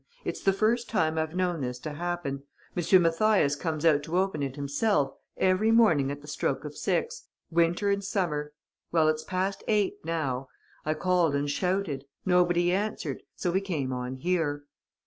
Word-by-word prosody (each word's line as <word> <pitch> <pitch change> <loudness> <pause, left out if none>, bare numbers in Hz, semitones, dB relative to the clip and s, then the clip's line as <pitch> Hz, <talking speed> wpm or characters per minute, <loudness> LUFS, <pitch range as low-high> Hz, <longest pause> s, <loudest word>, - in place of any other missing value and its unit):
"It's - - -3
the 195 - +4
first 225 +5 +1
time 160 -6 +1
I've 160 +1 -2
known 180 -3 0
this 125 -1 -3
to 155 - -5
happen. 170 -4 -3 0.3
M. 180 +2 +5
Mathias 165 -3 +3
comes 155 0 -3
out 150 -3 +5
to 160 +4 -2
open 190 -5 0
it 135 -1 -3
himself, 145 +3 +1 0.3
every 190 +4 +3
morning 210 -12 +4
at 145 0 -5
the 150 - -13
stroke 150 - -2
of - - -7
six, 470 +1 -1 0.3
winter 170 +4 +2
and 200 0 0
summer. 160 -8 -1 0.4
Well, 160 -2 +4
it's 155 0 -1
past 190 +2 -2
eight 210 -3 +1
now. 140 -6 -2 0.4
I 155 +1 0
called 175 -3 +2
and 140 +1 0
shouted. 180 -3 -1 0.2
Nobody 175 -1 +3
answered. 190 -8 -2
So 180 - -1
we 190 +2 +1
came 150 -9 -2
on 125 +1 -4
here." 150 -1 -1
170 Hz, 170 wpm, -28 LUFS, 145-190 Hz, 0.4 s, M